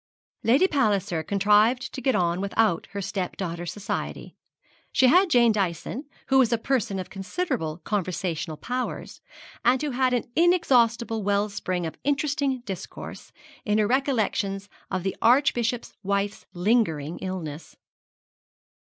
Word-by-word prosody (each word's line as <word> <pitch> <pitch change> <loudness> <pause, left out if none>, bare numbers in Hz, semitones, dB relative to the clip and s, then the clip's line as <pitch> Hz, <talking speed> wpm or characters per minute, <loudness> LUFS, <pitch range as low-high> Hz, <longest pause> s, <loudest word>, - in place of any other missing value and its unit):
Lady 270 +11 +5
Palliser 205 - +1
contrived 210 - +2
to 265 - -5
get 260 -3 +2
on 175 -1 +1
without 200 -3 +1
her 200 0 -5
step 185 -1 -3
daughter's 175 -2 -4
society. 205 +1 -5 0.6
She 260 - +4
had 360 +9 +5
Jane 240 -6 +5
Dyson, 205 - -2 0.2
who 265 0 +5
was 245 -3 +4
a 235 - +3
person 225 -5 -1
of 185 - -6
considerable 195 - -3
conversational 180 -5 -2
powers, 250 +6 -4 0.4
and 255 +1 +4
who 295 0 -2
had 255 0 +1
an 245 - +1
inexhaustible 240 -10 +3
well 205 +1 +1
spring 185 -3 -3
of 160 - -6
interesting 285 -2 0
discourse 195 -6 -8 0.3
in 210 0 +1
her 215 - +3
recollections 215 -6 0 0.2
of 185 -2 -2
the 190 - -2
Archbishop's 245 -2 +2
wife's 200 +1 -2
lingering 175 -6 0
illness. 170 -5 -6
210 Hz, 135 wpm, -25 LUFS, 185-255 Hz, 0.6 s, Lady